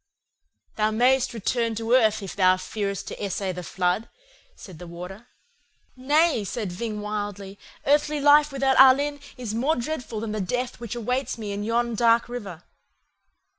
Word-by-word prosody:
"'Thou 215 0 +2
mayest 250 +4 +2
return 230 0 -1
to 225 +2 -1
earth 220 -4 +3
if 190 - -7
thou 185 -1 +4
fearest 200 +1 -4
to - - -6
essay 195 -1 -2
the 180 0 -6
flood,' 180 +4 -1 0.5
said 185 -6 -12
the 175 - -9
Warder. 180 +7 -9 0.7
"'Nay,' 290 0 +2
said 205 -1 -4
Ving 210 +3 -4
wildly, 205 -1 -5 0.3
'earthly 295 +1 +2
life 290 +1 +5
without 270 -1 +1
Alin 285 +2 +6 0.2
is 240 -4 -5
more 265 +8 +1
dreadful 245 -3 -4
than 220 0 -4
the 215 -1 -2
death 245 +6 -3
which 235 -1 -6
awaits 250 +3 -2
me 215 -3 -5
in 200 +1 -4
yon 235 +2 0
dark 230 +1 +3
river. 205 -9 -7
225 Hz, 160 wpm, -25 LUFS, 200-255 Hz, 0.7 s, Alin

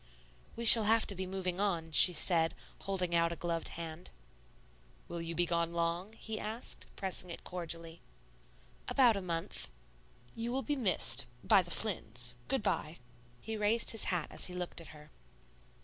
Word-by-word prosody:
"We 235 - -6
shall 225 -1 +11
have 225 +1 +2
to - - -2
be 185 0 -6
moving 185 -1 -4
on," 170 -5 -2
she 180 - +9
said, 165 -1 +2 0.2
holding 185 -3 -3
out 170 0 +1
a - - -5
gloved 170 -1 -3
hand. 165 +1 -8 1.0
"Will 170 -1 -7
you 165 0 -6
be 175 - +1
gone 170 0 -2
long?" 170 +4 -3
he 220 -1 -7
asked, 220 +3 -6
pressing 185 -2 -4
it 170 - -8
cordially. 165 -1 -5 0.9
"About 245 -5 +3
a 200 - -4
month." 165 - -3 0.6
"You 230 +1 -5
will 265 +2 -2
be 295 - -2
missed 180 - 0 0.2
by 195 - +4
the 175 - -9
Flynns. 120 - 0
Good 270 -5 -1
by." 155 +2 -3 0.4
He 220 - -6
raised 215 +2 +4
his 225 - +1
hat 175 -4 -3
as - - -2
he 180 - -9
looked 180 -1 -5
at 165 - -12
her. 150 0 -16
180 Hz, 170 wpm, -31 LUFS, 165-210 Hz, 1.0 s, shall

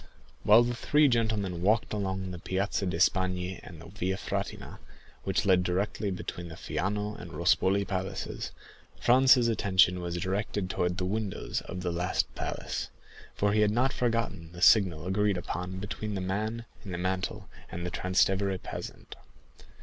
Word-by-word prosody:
While 110 +3 +7
the 120 0 -1
three 145 +6 +3
gentlemen 110 -8 0
walked 110 +5 +2
along 95 -2 -2
the 90 - -7
Piazza 95 +2 -1
di 90 - -1
Spagna 90 0 +1
and 85 -4 -11
the 85 - -11
Via 95 +1 -2
Frattina, - - -4 0.5
which - - 0
led 95 -2 +5
directly 100 +3 -1
between 90 -2 -5
the 80 - -9
Fiano 105 +6 -2
and 90 - -8
Rospoli 95 +3 +2
palaces, 95 -1 -3 0.5
Franz's 130 0 +6
attention 95 -5 +3
was 85 0 -3
directed 95 +1 -2
towards 90 0 0
the 90 0 -2
windows 100 0 -2
of 90 -1 -6
that 90 -1 -1
last 85 -8 -1
palace, - - -4 0.5
for 100 0 +1
he 105 - +3
had 105 - +4
not 125 +5 +2
forgotten 115 -9 -1
the 85 - -9
signal 90 -8 +5
agreed 100 +1 +1
upon 90 +1 -4
between 105 +2 -4
the - - -2
man 110 +5 -2 0.2
in 95 - -7
the 90 - -3
mantle 90 +1 -2 0.2
and 85 +1 -5
the 90 - -3
Transtevere 95 +2 +1
peasant. - - -8
95 Hz, 160 wpm, -29 LUFS, 90-105 Hz, 0.5 s, While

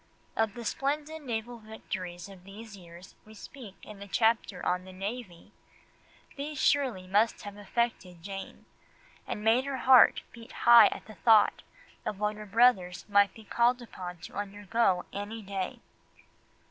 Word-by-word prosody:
Of 225 -2 0
the 240 -1 -8
splendid 300 +6 -2
naval 240 -2 -5
victories 185 -5 -7
of 190 -2 -14
these 210 +2 -11
years 175 0 -14
we 215 0 -16
speak 220 -3 -11
in 210 -2 -11
the 200 - -9
chapter 220 -3 0
on 180 0 0
the 185 - -12
Navy; 195 -1 -7 0.9
these 295 +2 -5
surely 255 -10 +1
must 210 +5 +1
have 205 -1 -8
affected 205 -4 -3
Jane, 195 0 -8 0.6
and 210 - -5
made 230 +4 +3
her 275 -1 -3
heart 255 -2 +6
beat 230 -1 -13
high 235 -1 +9
at - - -6
the 215 - -12
thought 215 +3 +4 0.4
of 205 - -4
what 210 0 -1
her 210 0 -10
brothers 190 -6 +2
might 200 -1 +3
be 220 - -13
called 240 +3 +2
upon 180 -7 -8
to - - -10
undergo 205 -1 0
any 210 +2 -6
day. 195 -1 -5
210 Hz, 155 wpm, -29 LUFS, 190-235 Hz, 0.9 s, high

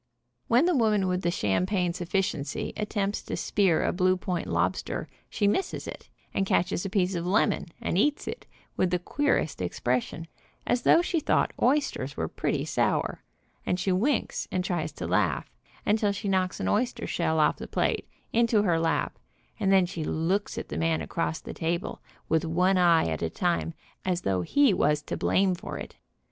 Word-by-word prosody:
When 245 +7 +4
the 355 -1 +3
woman 215 -6 +3
with 180 0 0
the 175 - +1
champagne 180 - 0
sufficiency 175 -4 -2
attempts 205 -1 -1
to - - -5
spear 185 -6 +2
a - - +1
blue 185 0 +2
point 180 -2 -3
oyster, 85 +2 -1 0.2
she 205 - +1
misses 295 - -1
it, - - -9 0.2
and 195 - +1
catches 180 -2 +1
a 195 - -3
piece 190 -2 +1
of 170 -1 -2
lemon, 195 0 +2
and 175 - 0
eats 295 +7 +1
it - - -6 0.3
with 185 - +2
the 180 - +1
queerest 180 - 0
expres 120 +7 0
sion, 165 +1 -8 0.4
as 245 - +1
though 335 - +5
she 350 -1 0
thought - - +1
oysters 250 - +1
were 80 - -1
pretty - - -2
sour, - - 0 0.5
arid 180 - +1
she 190 - 0
winks, 230 +9 0
and 185 -1 0
tries 175 -3 -2
to - - -6
laugh, - - 0 0.3
until 210 -1 +2
she 200 +1 -4
knocks 185 -1 0
an - - -2
oyster 240 +4 0
shell 160 0 0
off 155 - +3
the - - -7
plate, - - -1 0.2
into 230 -2 +3
her 170 -5 +2
lap, 165 0 0 0.4
and 195 -2 +2
then 190 -2 +5
she 170 -2 -5
looks 175 +7 -1
at - - -5
the - - -3
man 165 -1 +1
across 165 -1 -2
the - - -8
table, 170 +2 -2 0.3
with 160 0 +2
one 180 +4 +2
eye 170 -2 +5
at 80 -1 -2
a 80 - 0
time, 175 - 0 0.3
as 180 -1 0
though 95 - 0
he 280 - +3
was 150 -3 +2
to - - -4
blame 190 -1 +2
for 175 - -6
it. - - -8
185 Hz, 185 wpm, -27 LUFS, 165-205 Hz, 0.5 s, though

